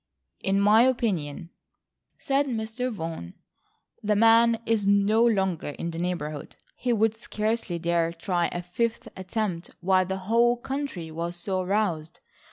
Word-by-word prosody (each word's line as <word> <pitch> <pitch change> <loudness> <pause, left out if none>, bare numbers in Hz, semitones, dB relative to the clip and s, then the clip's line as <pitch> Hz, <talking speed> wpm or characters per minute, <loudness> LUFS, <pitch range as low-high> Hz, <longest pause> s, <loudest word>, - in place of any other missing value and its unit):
"In 195 +1 +1
my 210 +3 +6
opinion," 185 - 0 0.7
said 280 +1 0
Mr. 235 +1 -3
Vaughan, 165 - -6 0.7
"the 210 0 +1
man 230 +1 +5
is 220 -3 +1
no 200 +3 +4
longer 190 -9 +1
in 170 - -3
the 165 - -6
neighbourhood. 160 -4 -4 0.2
He 245 - -1
would 220 -1 +2
scarcely 215 -4 -2
dare 170 0 +1
try 175 0 -1
a 175 - -5
fifth 225 +6 -2
attempt 190 -2 -3
while 185 0 +2
the 190 0 -2
whole 235 +3 +3
country 265 - -4
was 170 +2 -4
so 185 +2 -2
aroused. 180 -5 -1
200 Hz, 140 wpm, -26 LUFS, 175-230 Hz, 0.7 s, my